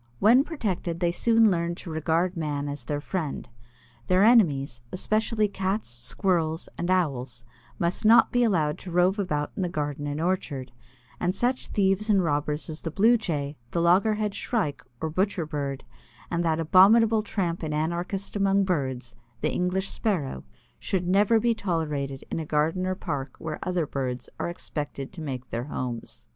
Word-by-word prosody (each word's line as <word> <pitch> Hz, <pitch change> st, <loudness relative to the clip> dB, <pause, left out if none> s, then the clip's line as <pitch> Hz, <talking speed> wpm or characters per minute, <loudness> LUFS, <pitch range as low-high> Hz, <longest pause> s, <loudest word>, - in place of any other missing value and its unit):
When 235 Hz, -, +6 dB
protected, 195 Hz, -, -3 dB
they 175 Hz, -1 st, +2 dB
soon 225 Hz, +3 st, +4 dB
learn 170 Hz, -1 st, -1 dB
to 170 Hz, -, -8 dB
regard 165 Hz, +3 st, 0 dB
man 145 Hz, -3 st, -2 dB
as 145 Hz, -4 st, -5 dB
their 145 Hz, -1 st, -2 dB
friend. 160 Hz, -2 st, -3 dB, 0.6 s
Their 185 Hz, +2 st, +4 dB
enemies, 145 Hz, -, +4 dB
especially 215 Hz, +3 st, +1 dB
Cats, 195 Hz, -, -2 dB
Squirrels, 155 Hz, +8 st, -1 dB
and 175 Hz, -, -3 dB
Owls, 130 Hz, -10 st, -1 dB, 0.3 s
must 170 Hz, +4 st, -1 dB
not 225 Hz, +2 st, +6 dB
be 245 Hz, 0 st, +3 dB
allowed 160 Hz, -9 st, +1 dB
to 185 Hz, -, -9 dB
rove 180 Hz, +3 st, +2 dB
about 150 Hz, -7 st, -1 dB
in -, -, -3 dB
the 180 Hz, -, 0 dB
garden 145 Hz, -2 st, -3 dB
and 145 Hz, +1 st, -3 dB
orchard, 160 Hz, -7 st, -2 dB, 0.5 s
and 180 Hz, +1 st, 0 dB
such 250 Hz, +5 st, 0 dB
thieves 195 Hz, +1 st, +1 dB
and 195 Hz, -3 st, +4 dB
robbers 150 Hz, -1 st, -1 dB
as 160 Hz, -1 st, -7 dB
the 165 Hz, -, -3 dB
Blue 220 Hz, +9 st, +4 dB
Jay, 150 Hz, -9 st, -2 dB
the 170 Hz, -, -1 dB
Loggerhead 205 Hz, +5 st, +3 dB
Shrike 150 Hz, -, -2 dB, 0.2 s
or 160 Hz, -1 st, -2 dB
Butcher 185 Hz, 0 st, 0 dB
Bird, 140 Hz, -3 st, -4 dB, 0.5 s
and 170 Hz, 0 st, 0 dB
that 165 Hz, -1 st, +1 dB
abominable 215 Hz, +7 st, +6 dB
tramp 185 Hz, -5 st, -2 dB
and 155 Hz, -2 st, -3 dB
anarchist 170 Hz, +6 st, -2 dB
among 200 Hz, 0 st, +3 dB
birds, 130 Hz, -9 st, -2 dB, 0.3 s
the -, -, +1 dB
English 185 Hz, +2 st, 0 dB
Sparrow, 155 Hz, -, -1 dB, 0.4 s
should 180 Hz, -2 st, -2 dB
never 205 Hz, +4 st, +4 dB
be 235 Hz, +1 st, +2 dB
tolerated 150 Hz, -9 st, -2 dB
in -, -, -1 dB
a 160 Hz, -, -4 dB
garden 160 Hz, +5 st, +1 dB
or 185 Hz, -, 0 dB
park 140 Hz, -8 st, -4 dB
where 155 Hz, -1 st, -5 dB
other 180 Hz, -3 st, 0 dB
birds 130 Hz, -3 st, -4 dB
are -, -, -1 dB
expected 145 Hz, -4 st, -5 dB
to 175 Hz, -, -8 dB
make 130 Hz, -4 st, -5 dB
their 120 Hz, +1 st, -3 dB
homes. 125 Hz, -5 st, -6 dB
170 Hz, 170 wpm, -26 LUFS, 145-195 Hz, 0.6 s, When